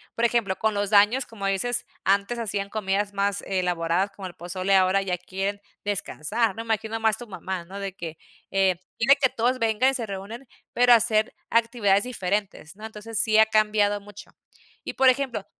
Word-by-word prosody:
por 235 Hz, -, +1 dB
ejemplo, 225 Hz, -5 st, +1 dB
con 220 Hz, -1 st, 0 dB
los 205 Hz, 0 st, -1 dB
daños, 215 Hz, +5 st, +4 dB
como 205 Hz, -3 st, -7 dB
dices, 195 Hz, +5 st, -1 dB, 0.2 s
antes 200 Hz, +5 st, +1 dB
hacían 200 Hz, -3 st, -3 dB
comidas 205 Hz, -1 st, -1 dB
más 200 Hz, 0 st, -1 dB
elaboradas 180 Hz, 0 st, 0 dB
como 195 Hz, -1 st, -8 dB
el 180 Hz, -, -10 dB
pozole, 185 Hz, +3 st, -1 dB
ahora 190 Hz, +1 st, +3 dB
ya 185 Hz, -2 st, -1 dB
quieren 195 Hz, +3 st, -4 dB, 0.2 s
descansar, 205 Hz, +2 st, -1 dB
¿no? 225 Hz, -, -5 dB
Imagino 225 Hz, 0 st, -2 dB
más 220 Hz, -1 st, +1 dB
tu 240 Hz, -, -9 dB
mamá, 185 Hz, -2 st, -5 dB
¿no?, 195 Hz, +3 st, -8 dB
de 195 Hz, -1 st, -5 dB
que: 165 Hz, -5 st, -7 dB, 0.3 s
"Eh 190 Hz, -2 st, +2 dB, 0.2 s
dile 270 Hz, +5 st, +5 dB
que 270 Hz, -2 st, +3 dB
todos 250 Hz, +3 st, 0 dB
vengan". 230 Hz, +3 st, +2 dB
Y -, -, -6 dB
se 240 Hz, -4 st, -3 dB
reúnen, 210 Hz, +6 st, -7 dB, 0.3 s
pero 245 Hz, 0 st, +6 dB
a -, -, +10 dB
hacer 220 Hz, -1 st, +1 dB, 0.2 s
actividades 230 Hz, -4 st, +2 dB
diferentes, 200 Hz, -6 st, -3 dB
¿no? 215 Hz, -, -14 dB
Entonces, 220 Hz, +1 st, -6 dB
sí 215 Hz, -1 st, +3 dB
ha 220 Hz, -, +8 dB
cambiado 210 Hz, -1 st, +2 dB
mucho. 205 Hz, 0 st, -13 dB, 0.5 s
Y, -, -, -5 dB
por 265 Hz, -1 st, +5 dB
ejemplo, 255 Hz, -5 st, -1 dB
205 Hz, 190 wpm, -25 LUFS, 195-225 Hz, 0.5 s, a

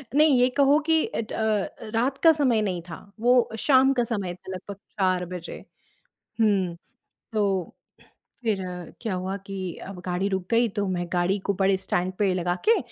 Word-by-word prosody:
नहीं, 300 Hz, -4 st, +5 dB
ये 250 Hz, -, +5 dB
कहो 285 Hz, +2 st, +5 dB
कि 320 Hz, -1 st, +4 dB
अ -, -, -3 dB
अ, 220 Hz, -2 st, -1 dB, 0.3 s
रात 260 Hz, +4 st, +1 dB
का 325 Hz, -, +9 dB
समय 240 Hz, -6 st, +3 dB
नहीं 185 Hz, -4 st, -2 dB
था। -, -, -6 dB, 0.2 s
वो 245 Hz, +1 st, +4 dB
शाम 270 Hz, -1 st, +5 dB
का 245 Hz, -2 st, +1 dB
समय 200 Hz, -6 st, -2 dB
था 190 Hz, -, -11 dB
लगभग 195 Hz, +2 st, -7 dB, 0.2 s
4 185 Hz, -1 st, +2 dB
बजे। 175 Hz, -1 st, -7 dB, 0.8 s
हुँ, 190 Hz, -5 st, +2 dB, 0.6 s
तो 210 Hz, -1 st, +2 dB, 1.0 s
फिर 215 Hz, -4 st, +1 dB, 0.4 s
क्या 220 Hz, -5 st, -2 dB
हुआ 185 Hz, +2 st, -3 dB
कि 195 Hz, -1 st, -5 dB, 0.3 s
अब 195 Hz, -2 st, -8 dB
गाड़ी 180 Hz, +2 st, 0 dB
रुक 190 Hz, -2 st, -2 dB
गई 230 Hz, 0 st, +3 dB
तो 200 Hz, -1 st, 0 dB
मैं 175 Hz, -1 st, -2 dB
गाड़ी 180 Hz, +3 st, +1 dB
को 200 Hz, -, +1 dB
बड़े 195 Hz, 0 st, +4 dB
स्टैंड 185 Hz, 0 st, -1 dB
पे 200 Hz, -3 st, +2 dB
लगा 175 Hz, 0 st, 0 dB
के 460 Hz, -, +6 dB
200 Hz, 175 wpm, -25 LUFS, 185-240 Hz, 1.0 s, का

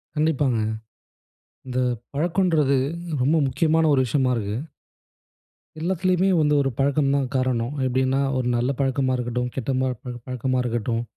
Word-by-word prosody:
கண்டிப்பாங்க. 145 Hz, -5 st, +1 dB, 1.1 s
இந்த 130 Hz, -1 st, -3 dB, 0.4 s
பழக்கம்ன்றது 160 Hz, -3 st, +2 dB, 0.4 s
ரொம்ப 145 Hz, +6 st, +3 dB
முக்கியமான 160 Hz, +5 st, +2 dB
ஒரு 135 Hz, -, +3 dB
விஷயமா 130 Hz, +1 st, +1 dB
இருக்கு. 105 Hz, -1 st, -3 dB, 1.2 s
எல்லாத்துலையுமே 185 Hz, +2 st, +1 dB
வந்து 150 Hz, -1 st, +3 dB
ஒரு 135 Hz, -, +1 dB
பழக்கம் 140 Hz, 0 st, +2 dB
தான் 140 Hz, -2 st, 0 dB
காரணம். 130 Hz, 0 st, 0 dB
எப்படின்னா, 130 Hz, +1 st, +1 dB, 0.2 s
ஒரு 125 Hz, -1 st, -1 dB
நல்ல 120 Hz, +3 st, +1 dB
பழக்கமா 135 Hz, -1 st, +1 dB
இருக்கட்டும், 125 Hz, 0 st, -2 dB
கெட்ட 135 Hz, 0 st, -2 dB
ம 130 Hz, 0 st, +1 dB, 0.3 s
பழக்கமா 130 Hz, 0 st, -2 dB
இருக்கட்டும். 115 Hz, -1 st, -1 dB
135 Hz, 125 wpm, -23 LUFS, 125-150 Hz, 1.2 s, ரொம்ப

